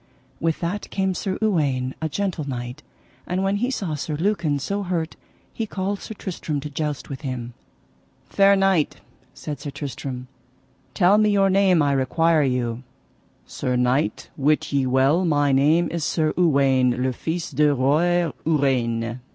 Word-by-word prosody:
With 165 -1 -1
that 180 +4 -3
came 190 -1 0
Sir 190 +1 -3
Uwaine, 140 -11 +1
a 160 - -1
gentle 165 -3 -2
knight, 125 +2 -5 0.5
and 185 +2 -1
when 195 +1 +1
he 245 +5 0
saw 195 -11 -3
Sir 150 +1 -3
Lucan 170 -3 0
so 200 +9 -2
hurt 175 -4 -2 0.4
he 225 - -3
called 200 0 -3
Sir 220 - -7
Tristram 165 -6 -4
to 150 +1 -7
joust 150 0 -3
with 135 -2 -7
him. 125 -4 -5 0.7
Fair 200 0 +4
knight, 195 -5 +2 0.4
said 145 -3 -6
Sir 145 +1 -6
Tristram, 135 -3 -6 0.7
tell 195 +2 +5
me 215 0 +4
your 195 -1 +3
name 190 -4 +4
I 140 - +2
require 155 +4 +2
you. 125 -3 -1 0.6
Sir 125 -1 -3
knight, 125 +4 0
wit 150 +1 +1
ye 135 -2 +2
well 135 +7 +3
my 145 -4 +2
name 155 +6 +3
is 170 -1 -2
Sir 155 0 0
Uwaine 135 -7 +3
le 130 0 0
Fise 165 +6 -4
de 150 -1 +3
Roy 160 +6 +2
Ureine. 125 -6 0
155 Hz, 160 wpm, -23 LUFS, 135-180 Hz, 0.7 s, tell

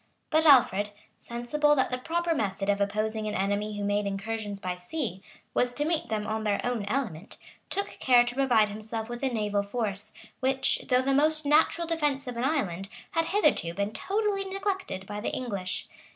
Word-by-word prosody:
] - - -45
But 315 0 +4
Alfred, 210 -7 +6 0.3
sensible 295 +6 +1
that 265 -2 +1
the 250 - -1
proper 335 +4 0
method 195 -6 -1
of 200 0 +2
opposing 215 +2 -1
an 210 - -2
enemy 205 +2 -1
who 205 - -3
made 205 0 +1
incursions 205 +1 -3
by 180 -2 -3
sea, 190 - -4 0.3
was 245 0 +1
to 295 - 0
meet 325 0 -1
them 215 -1 -1
on 220 +1 -2
their 205 -2 +1
own 240 -4 -1
element, 205 - -3 0.3
took 400 +1 0
care 245 -2 +6
to 245 0 -3
provide 245 -5 +3
himself 220 +2 -5
with 240 0 -5
a 270 - +1
naval 210 -4 0
force,[*] 210 -1 -3 0.3
which, 265 +1 +1
though 250 0 +4
the 275 +1 +2
most 305 +2 +3
natural 310 +3 +3
defence 295 -5 0
of 250 -1 -5
an 235 - -2
island, 195 - -1 0.2
had 330 0 +1
hitherto 305 - +2
been 200 +2 -1
totally 410 -1 0
neglected 385 - -3
by 205 +1 -5
the - - -1
English. 200 -7 -3
235 Hz, 190 wpm, -28 LUFS, 205-295 Hz, 0.3 s, Alfred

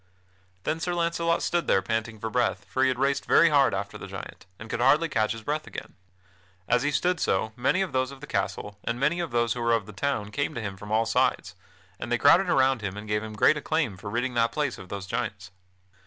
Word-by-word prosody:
Then 160 - -1
Sir 175 +1 -2
Launcelot 170 0 0
stood 175 -1 0
there 95 - +3
panting 110 +1 -2
for 115 +1 -4
breath, 120 -5 0
for 130 - -2
he 135 - +5
had 130 -1 0
raced 140 +1 +1
very 170 - +6
hard 140 -3 +4
after 100 +1 -5
the - - -8
giant, - - -9
and 110 - -9
could 115 - -3
hardly 145 +6 +4
catch 110 -7 0
his 115 -1 -9
breath 150 +5 -2
again. - - -8 0.7
As 125 - +3
he 145 - +1
stood 180 +4 +1
so, 110 0 0
many 130 +10 +1
of 190 - -5
those 130 -1 0
of 140 -1 -11
the 150 - -9
castle 100 -2 -3
and 115 +1 -2
many 150 +6 +1
of 170 -2 -2
those 120 -1 +1
who 120 - -5
were 115 0 +2
of 115 -4 +1
the 105 - -11
town 105 -1 -2
came 140 +6 -2
to - - -3
him 100 -3 -4
from 105 +2 -10
all 110 +1 +3
sides; - - +1 0.5
and - - -6
they 120 - +3
crowded 170 +8 +5
around 130 -4 +3
him 100 -1 -4
and 105 +1 -8
gave 105 0 0
him 110 0 -7
great 130 +8 +4
acclaim 150 -8 -1
for 100 +2 -8
ridding 125 +4 -1
that 115 -1 +2
place 145 -3 -2
of 95 - -11
those 100 -1 -5
giants. 100 -2 -4
120 Hz, 245 wpm, -26 LUFS, 105-145 Hz, 0.7 s, very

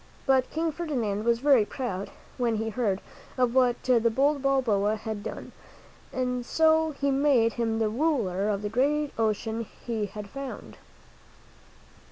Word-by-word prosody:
But 265 -2 +3
King 325 +1 -1
Ferdinand 240 -11 -2
was 235 0 +3
very 275 -5 +5
proud 205 -4 -4 0.3
when 235 -2 +1
he 220 +1 -2
heard 205 -4 -1 0.4
of 250 -2 +2
what 250 -2 +2
the 250 -2 +4
bold 280 +5 +1
Balboa 225 -7 +2
had 215 -1 -5
done, - - -7 0.6
and 250 -1 -2
so 320 +4 +3
he 280 -1 -1
made 270 -5 +3
him 225 -2 -1
the 225 -1 +1
ruler 215 - 0
of 205 -1 -1
the 210 - -2
great 285 +5 +1
ocean 220 0 -1 0.2
he 220 -3 -2
had 210 0 -8
found. 275 +5 -8
240 Hz, 150 wpm, -27 LUFS, 215-275 Hz, 0.6 s, very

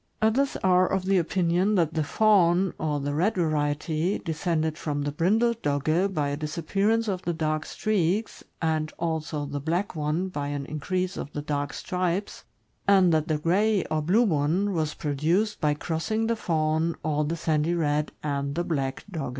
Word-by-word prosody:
Others 260 +6 +2
are 185 -1 +4
of 190 -1 0
the 195 -1 +3
opinion 180 +4 +1
that 165 -4 +2
the 155 - 0
fawn, 185 +1 +3
or 150 -2 -1
the 145 +1 -2
red 185 +9 +1
variety, 155 +1 0
descended 160 -2 -1
from 145 -2 -3
the 145 - -2
brindled 220 +9 +1
Dogge 155 +7 +1
by 150 -6 0
a 145 - -2
disappearance 195 +9 0
of 190 -3 -1
the 175 - -2
dark 155 -1 -1
streaks, 210 0 -1 0.2
and 155 -1 0
also 160 -3 -2
the'black 160 +8 -2
one 155 +4 -1
by 145 -5 -4
an 145 -1 -3
increase 180 +6 -2
of 145 - -5
the 145 - -3
dark 145 -1 -2
stripes, 180 +6 -3 0.4
and 190 -4 +5
that 155 0 +1
the 155 -2 +1
gray, 195 +6 +2
or 155 0 +1
blue 190 +10 +3
one, 180 +2 +1
was 155 -3 -1
produced 165 +9 0
by 150 -1 +2
crossing 175 +9 -2
the 230 +1 +1
fawn, 160 -4 0
or 150 -1 0
the 165 +3 -2
sandy 160 +1 +1
red, 150 -2 0
and 140 -1 -2
the 175 - 0
black 135 -6 -2
Dogge. 155 -7 -3
165 Hz, 175 wpm, -26 LUFS, 150-185 Hz, 0.4 s, and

